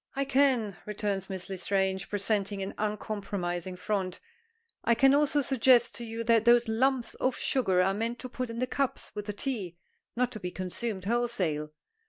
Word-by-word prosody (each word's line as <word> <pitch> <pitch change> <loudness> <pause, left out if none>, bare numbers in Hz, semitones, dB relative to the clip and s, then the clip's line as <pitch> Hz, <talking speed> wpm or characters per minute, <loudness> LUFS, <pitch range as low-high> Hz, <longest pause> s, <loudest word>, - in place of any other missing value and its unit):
"I 275 0 0
can," 260 -7 +2
returns 205 -2 -2
Miss 190 -2 -5
L'Estrange, 190 0 -1
presenting 200 -1 -1
an 190 - -5
uncompromising 200 -4 -3
front. 185 0 -2 0.6
"I 235 - +3
can 270 +3 +5
also 290 0 +3
suggest 255 -2 +4
to 240 - -6
you 230 0 -4
that 230 -1 +4
those 240 0 +5
lumps 245 +2 +1
of 255 0 +1
sugar 190 -9 +2
are 195 +1 +2
meant 230 +4 -2
to 255 - -5
put 255 0 -4
in 230 - -6
the 250 - +1
cups 270 +1 -2
with 210 0 -6
the 210 - -2
tea, 205 -7 -4 0.4
not 250 +1 +1
to 220 - -7
be 180 - -4
consumed 185 +2 -4
wholesale. 200 -10 0
215 Hz, 175 wpm, -29 LUFS, 190-245 Hz, 0.6 s, can